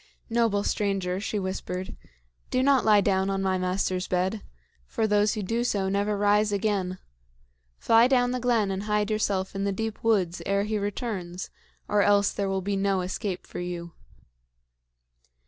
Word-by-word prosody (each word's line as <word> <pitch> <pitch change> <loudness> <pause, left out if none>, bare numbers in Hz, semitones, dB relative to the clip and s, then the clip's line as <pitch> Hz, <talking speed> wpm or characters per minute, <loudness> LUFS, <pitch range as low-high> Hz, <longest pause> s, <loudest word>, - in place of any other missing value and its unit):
"Noble 225 -3 +2
stranger," 195 -4 -1
she 210 +1 -3
whispered, 185 -1 -4 0.5
"do 255 - +1
not 275 -2 +4
lie 210 -2 +5
down 190 -1 +1
on 195 0 -1
my 190 -1 +1
master's 185 0 -1
bed, 185 +4 0 0.5
for 220 - -1
those 210 +1 +2
who 210 - -3
do 230 +5 -1
so 200 -5 0
never 200 +1 0
rise 205 +1 +3
again. 195 -3 -1 0.8
Fly 230 +1 +5
down 245 -2 +2
the 250 - -1
glen 230 -5 +1
and 190 0 -2
hide 210 0 0
yourself 200 -3 -1
in 195 0 -3
the 200 - 0
deep 220 +2 -4
woods 190 -6 +1
ere 200 0 +1
he 210 0 -1
returns, 195 -4 -4 0.4
or 205 0 +2
else 200 0 +4
there 200 -1 -2
will 190 -1 -1
be 200 +1 -1
no 195 -1 +1
escape 185 +1 -4
for - - -7
you." 175 -1 -5
200 Hz, 165 wpm, -26 LUFS, 190-215 Hz, 0.8 s, lie